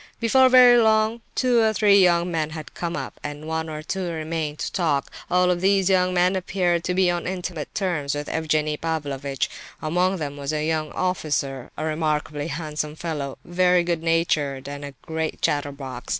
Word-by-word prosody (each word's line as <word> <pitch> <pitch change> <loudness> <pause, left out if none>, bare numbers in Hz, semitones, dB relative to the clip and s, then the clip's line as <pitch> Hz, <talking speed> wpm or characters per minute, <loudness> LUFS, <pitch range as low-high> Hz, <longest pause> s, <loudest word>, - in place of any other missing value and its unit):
Before 260 +3 +5
very 250 -1 +8
long 220 +1 +2
two 250 -2 +3
or 220 -1 +3
three 200 -1 +5
young 175 -1 +3
men 160 -2 -1
had 155 -1 -8
come 170 0 -3
up, - - -6
and 145 +1 -6
one 160 0 -2
or 155 0 -6
two 190 +2 -3
remained 160 -2 -3
to - - -4
talk; 155 -6 0 0.2
all 180 0 +3
of 175 -1 -1
these 195 0 +3
young 185 -1 +3
men 180 +1 +2
appeared 180 -2 0
to 180 - -1
be 185 -1 +3
on 175 -1 -3
intimate 180 -4 -5
terms 165 -8 -1
with 145 0 -4
Evgenie 155 -1 0
Pavlovitch. 140 -5 -2 0.3
Among 180 +4 +1
them 145 -3 -5
was 140 +1 -3
a 150 0 -1
young 155 -1 -1
officer, 145 -8 -2
a 155 - -3
remarkably 155 -1 -1
handsome 150 -1 -4
fellow—very 175 +4 0
good 170 -2 -1
natured 155 -5 0
and 145 0 -6
a 140 -1 -8
great 160 0 -3
chatterbox. 140 -3 -2
160 Hz, 180 wpm, -23 LUFS, 150-180 Hz, 0.3 s, very